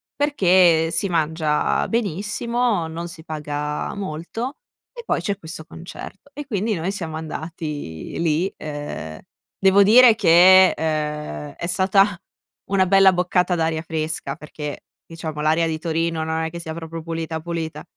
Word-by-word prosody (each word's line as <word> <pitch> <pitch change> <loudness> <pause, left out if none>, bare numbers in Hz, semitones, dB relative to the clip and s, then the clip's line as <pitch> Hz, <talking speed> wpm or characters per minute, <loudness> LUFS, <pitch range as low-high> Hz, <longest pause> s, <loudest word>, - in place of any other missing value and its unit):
perché 180 - +3
si 195 - 0
mangia 160 -2 0
benissimo, 215 -1 -1
non 170 +2 -6
si 160 -2 -11
paga 150 -1 -4
molto 200 - -5 0.4
e 475 -1 -9
poi - - 0
c'è 200 -1 -2
questo 160 -3 -9
concerto." 180 - -11
E, 290 0 -7
quindi, 215 -2 -1
noi 175 +3 -2
siamo 160 -5 -5
andati 155 - -6
lì. 170 +3 0
Uhm, 145 - -6 0.4
devo 195 +1 +5
dire 230 +2 +7
che, 185 0 +7
uhm, 150 - -3
è 170 - -4
stata 190 +1 +3 0.5
una 190 -1 +3
bella 195 0 +6
boccata 180 0 +1
d'aria 160 -1 0
fresca 155 -3 -3
perché, 150 -1 -7 0.2
diciamo, 160 -2 -6
l'aria 160 +2 +2
di 160 - -2
Torino 165 0 -1
non 160 0 -2
è - - -3
che 170 +1 -8
sia 160 -1 -6
proprio 165 0 -7
pulita, 165 -1 -4
pulita. 165 -1 -5
165 Hz, 145 wpm, -22 LUFS, 160-190 Hz, 0.5 s, dire